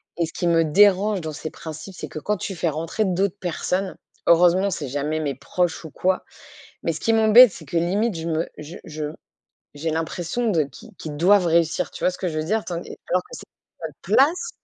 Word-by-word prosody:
Et 170 - 0
ce 160 - -9
qui 175 - -1
me 165 -1 +4
dérange 200 +5 +4
dans 160 -2 -5
ces 155 +1 -6
principes, 160 +4 -9
c'est - - -6
que - - -9
quand 210 +7 -1
tu 195 +1 -5
fais 170 -1 0
rentrer 165 +7 -2
d'autres 195 0 0
personnes, 185 +1 -2 0.3
heureusement, 180 +3 +5
c'est 150 -5 -4
jamais 145 +4 -2
mes 145 -3 -2
proches 165 +7 -2
ou 160 - -9
quoi, 185 +4 0 0.6
mais - - 0
ce - - -6
qui 225 - +1
m'embête 225 +1 +7
c'est 165 - -11
que, 155 +4 -5
limite, 195 +5 +1
je 165 - -5
me 165 0 -1
je 155 +4 -9
je 155 -1 -6 0.7
j'ai 150 +3 -4
l'impression 170 +8 -2
de 165 -6 +2
qui 135 -2 -13
qu'ils 150 -2 -6
doivent 185 +4 +4
réussir. 165 -1 +1
Tu - - -7
vois - - +4
ce 185 - -10
que 185 - -2
je 155 -2 -3
veux 155 - -1
dire? 215 +6 0
Tandis 175 -1 -5 0.2
alors 180 - +2
que - - -25
c'est - - -9 0.4
notre 160 -2 -6
place, 290 - +2
175 Hz, 220 wpm, -23 LUFS, 160-195 Hz, 0.7 s, m'embête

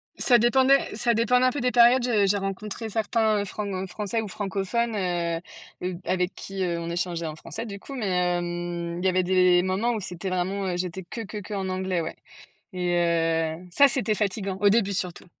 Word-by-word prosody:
Ça 240 -2 +4
dépendait 260 +1 +3
ça 235 +1 +2
dépendait 250 +3 +3
un 255 - +4
peu 285 - -4
des 250 0 +1
périodes. 245 +1 +6
J 215 -5 +2
j'ai 205 - +2
rencontré 200 +3 -4
certains, 220 0 +1
heu, - - -3
franc 190 -1 -4
français 210 +4 -2
ou 215 - -5
francophones, 205 +4 -2
heu, 175 0 -4
avec 180 0 0
qui, 195 -1 -5
heu, 170 -1 -1
on 170 0 -5
échangeait 170 -1 -2
en 155 - -5
français 160 +8 -7
du 200 -1 -7
coup, 275 - -10
mais, 240 -6 -3 0.3
hem, 175 0 -4
il 185 - -4
y - - +5
avait 185 0 +2
des 180 -1 +4
moments 190 +6 0
où 220 - -2
c'était 180 0 -5
vraiment, 185 +2 -1
heu, 175 -1 -1
j'étais 180 +1 -4
que, 230 +7 -7
que, 215 0 -7
qu'en 200 -2 -4
anglais, 185 -1 -1
ouais. 160 - -5 0.6
Et 180 -2 -1
heu, 165 0 0
ça, 280 +10 +6
c'était 235 -4 0
fatigant 200 -2 -2
au 205 - +6
début 200 -2 +2
surtout. 180 -2 -4
190 Hz, 205 wpm, -25 LUFS, 175-220 Hz, 0.6 s, périodes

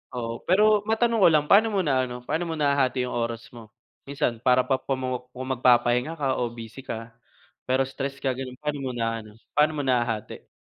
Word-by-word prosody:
Oo, 115 -1 -4
pero 210 +3 +5
matanong 230 +1 +2
ko 195 - +7
lang, 155 -3 +4
paano 215 +3 +7
mo 205 -3 0
na 130 -4 +1
ano, 125 0 -8
paano 165 +7 -2
mo 165 - -3
nahahati 140 -4 +1
'yong 125 - -4
oras 115 -1 -3
mo? 115 -2 -12 0.4
Minsan 130 -4 -1
para 125 +2 +3
pa 135 0 0
kung 130 -1 -3 0.5
magpapahinga 125 +3 +3
ka 135 -4 -1
o 120 - 0
busy 115 +1 -10
ka 115 -3 -7 0.6
pero 130 +1 +2
stress 135 +1 -5
ka 135 - +2
gano'n, 130 0 -6
paano 150 -1 -3
mo 130 -2 -3
na 115 -1 -1
ano, 110 -1 -13 0.2
paano 150 +1 +2
mo 145 - -2
nahahati? 120 -4 -1
130 Hz, 200 wpm, -25 LUFS, 120-150 Hz, 0.6 s, ko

